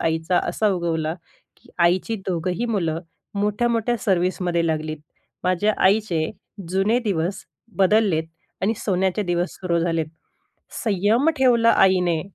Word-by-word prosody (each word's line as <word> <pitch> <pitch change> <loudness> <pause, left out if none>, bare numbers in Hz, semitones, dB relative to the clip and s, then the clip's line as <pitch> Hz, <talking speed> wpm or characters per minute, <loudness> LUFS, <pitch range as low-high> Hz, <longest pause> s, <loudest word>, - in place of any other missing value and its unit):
आईचा 160 +2 +1
असा 215 - +1
उगवला 165 -3 -1 0.4
की - - -24
आईची 180 +6 +2
दोघंही 180 +5 -1
मुलं 170 -8 -1 0.3
मोठ्या-मोठ्या 230 +3 0
सर्व्हिसमध्ये 180 -2 +1
लागलीत. 155 -1 -2 0.5
माझ्या 185 +4 +2
आईचे 190 -6 +1 0.4
जुने 195 +6 +2
दिवस 185 -2 -1 0.3
बदललेत 195 -4 +3 0.4
आणि 220 +4 +2
सोन्याचे 190 +1 +1
दिवस 175 -1 -1
सुरू 175 -2 0
झालेत. 165 -2 0 0.8
संयम 215 - +2
ठेवला 235 -3 +4
आईने. 180 -4 +3
185 Hz, 110 wpm, -22 LUFS, 170-210 Hz, 0.8 s, ठेवला